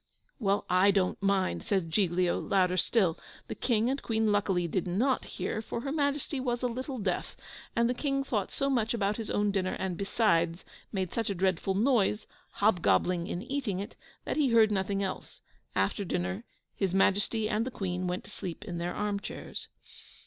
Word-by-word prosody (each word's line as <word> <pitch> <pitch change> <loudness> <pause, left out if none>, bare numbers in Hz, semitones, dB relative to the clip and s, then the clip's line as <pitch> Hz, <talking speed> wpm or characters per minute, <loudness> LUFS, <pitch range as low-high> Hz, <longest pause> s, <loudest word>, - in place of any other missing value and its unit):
"Well, 200 -3 +1
I 185 +2 +5
don't 195 -2 +1
mind," 195 -1 +1
says 195 -6 0
Giglio, 175 0 +1
louder 185 -2 +2
still. 185 -2 +2 0.3
The - - -5
King 230 -2 +1
and 275 +2 -1
Queen 220 -2 +1
luckily 195 -4 +1
did 180 +2 -1
not 240 +9 +1
hear 220 - -3
for 230 - -4
her 275 - -3
Majesty 285 -1 0
was 245 -1 -1
a - - +3
little 255 +3 -4
deaf, 195 -5 -2 0.4
and 235 0 +3
the 245 - +1
King 275 +1 -1
thought 215 -7 -1
so 275 - 0
much 235 -4 +1
about 205 -2 0
his 225 -2 -5
own 205 0 +1
dinner, 185 -2 0
and, 185 -2 -2
beside, 175 -5 +1 0.3
made 190 -4 -2
such 230 -2 -1
a 200 - -1
dreadful 190 +1 +1
noise, 220 -2 +2 0.3
hob 200 -3 +2
gobbling 175 0 +2
in 175 - -3
eating 245 -7 -2
it, 200 - -6 0.3
that - - -2
he 290 -4 +3
heard 225 -2 +5
nothing 195 0 0
else. 190 - -5 0.4
After 95 - +1
dinner, 190 +4 -2 0.3
his 190 -2 0
Majesty 205 +3 +2
and 215 0 +1
the 255 - -3
Queen 185 -6 -3
went 180 +1 -2
to - - -14
sleep 185 +3 -6
in 175 -4 -4
their 175 +1 -2
arm 205 -1 -1
chairs. - - -7
200 Hz, 190 wpm, -30 LUFS, 185-230 Hz, 0.4 s, I